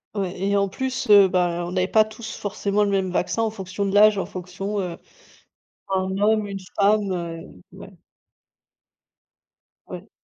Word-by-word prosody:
Ouais 190 -2 -3
et 200 +1 +1
en 200 0 +1
plus, 260 +4 -3
heu, 200 -2 +8
bah 175 -1 0
on - - -6
n'avait 185 0 0
pas 215 +1 +4
tous 220 +1 -9
forcément 205 0 -1
le 205 - 0
même 190 -2 0
vaccin 205 +5 -1
en 220 - 0
fonction 195 -1 -4
de 195 - -2
l'âge, 210 0 +6
en - - -1
fonction, 195 +3 -5
heu, 175 -2 -5 0.9
d'un 190 0 -1
homme, 215 0 +2
une 195 -1 -6 0.2
femme, 205 0 +3
heu. 165 - -6
Ouais. - - -12 2.0
Ouais. - - -9
195 Hz, 165 wpm, -23 LUFS, 185-210 Hz, 2.0 s, heu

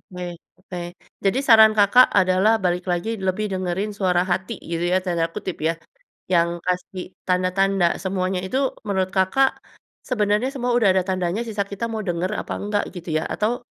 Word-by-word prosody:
Baik 175 -1 -6 0.2
oke 185 -1 -9 0.5
jadi 195 +7 +2
saran 220 -2 +8
Kakak 210 +5 +6
adalah 185 +3 +3
balik 180 0 0
lagi 175 +5 -1 0.2
lebih 185 +3 0
dengerin 190 +3 -2
"suara 185 -3 +2
hati" 185 +1 -2
gitu 170 0 -1
ya 185 - +4
tanda 170 -2 0
kutip 185 +1 -5
ya, 165 - +1 0.6
yang 170 -2 +3 0.2
kasih 180 +1 -3 0.2
tanda-tanda 185 0 +1
semuanya 185 -1 -2
itu 255 +8 -1 0.3
menurut 190 -2 0
Kakak, 195 +9 +2 0.5
sebenarnya 210 0 +1
semua 250 -2 -2
udah 200 -6 +4
ada 190 - +3
tandanya 185 +3 -1
sisa 215 -3 -2
kita 200 +3 -5
mau 220 -1 -3
denger 175 +1 -1
apa - - -6
nggak 205 0 0
gitu 175 -1 -9
ya 155 - -3
atau. 240 +3 -2
190 Hz, 165 wpm, -22 LUFS, 180-210 Hz, 0.6 s, saran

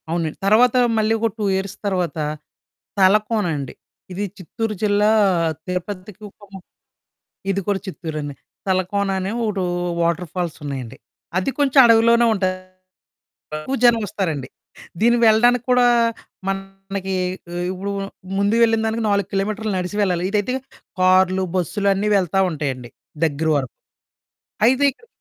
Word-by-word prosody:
అవునండి. 165 -2 -2
తర్వాత 225 +5 +5 0.2
మళ్లీ 220 0 +2
ఒక 230 +1 +1
2 215 - -2
ఇయర్స్ 190 0 -3
తర్వాత 180 -5 -1 0.8
తలకోనండి. 190 - +2 0.4
ఇది 195 +3 -3
చిత్తూరు 215 +4 -4
జిల్లా, 210 0 +3 0.6
తిరుపతికొక 190 +2 -6 1.1
ఇది 195 0 0
కూడా 200 -1 +1
చిత్తూరేనే. 155 -6 -5 0.3
తలకోన 190 +2 0
అనే 190 +1 -2
ఒకటో 205 -4 -1 0.4
వాటర్ 170 +1 0
ఫాల్స్ 175 -3 -3
ఉన్నాయండి. 135 -5 -5 0.4
అది 190 - 0
కొంచెం 280 -1 +2
అడవిలోనే 230 +1 +5
ఉంటాది. 185 -2 -1 1.0
ఎక్కువ 205 +13 -3
జనం 235 -1 +6
వస్తారండి. 160 -10 -3 0.5
దీనికి 235 +1 +3
వెళ్లడానికి 240 +2 +4
కూడా 250 -1 +5 0.6
మనకి, 195 0 -4 0.6
ఇప్పుడు 195 +2 -4 0.5
ముందు 200 +2 +2
వెళ్లిన 225 -1 +3
దానికి 225 +1 -1
4 200 -1 +1
కిలోమీటర్లు 210 +2 -1
నడిసి 180 +3 -4
వెళ్లాలి. 180 -3 0
ఇదైతే 210 +4 0 0.5
కారులు, 185 0 +4
బస్సులు 200 +3 0
అన్నీ 200 +2 -1
వెళ్తా 195 0 +1
ఉంటాయండి 135 -6 -4 0.3
దగ్గర 160 0 0
వరకు. 130 -4 -2 0.9
అయితే 260 +4 +3
ఇక్కడ 465 - -23
195 Hz, 120 wpm, -21 LUFS, 180-215 Hz, 1.1 s, జనం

